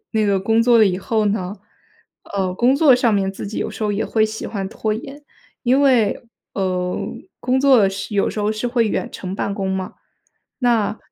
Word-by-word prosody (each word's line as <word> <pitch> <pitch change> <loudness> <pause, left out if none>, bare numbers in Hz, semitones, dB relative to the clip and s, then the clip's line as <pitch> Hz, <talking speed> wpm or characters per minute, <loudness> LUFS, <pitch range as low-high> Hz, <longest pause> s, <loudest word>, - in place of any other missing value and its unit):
那 220 -1 +1
个 200 -1 +2
工 225 +3 +2
作 235 -1 +5
了 215 - +6
以 180 -1 0
后 215 +1 0
呢， 200 -1 -1 0.8
呃， 190 -2 -1
工 245 +6 +3
作 290 -4 +6
上 245 -2 +2
面 195 -1 +1
自 195 - -7
己 210 - -5
有 - - -2
时 - - -7
候 210 - +1
也 205 - -1
会 220 -1 +2
喜 220 0 -5
欢 195 -3 -4
拖 215 0 -2
延。 275 +6 -8 0.4
因 260 +2 +3
为， 250 -7 +3 0.3
呃， 180 -2 -1 0.4
工 260 +1 +1
作 275 -3 +6
的 200 - +4
时 195 +2 -6
有 200 - +2
时 215 - -4
候 205 - +1
是 215 +2 -2
会 235 -2 +1
远 - - -2
程 185 0 -6
办 200 0 -2
公 195 -2 -2
嘛， 190 -1 -4 0.6
那 230 -4 +1
215 Hz, 225 characters per minute, -20 LUFS, 195-240 Hz, 0.8 s, 了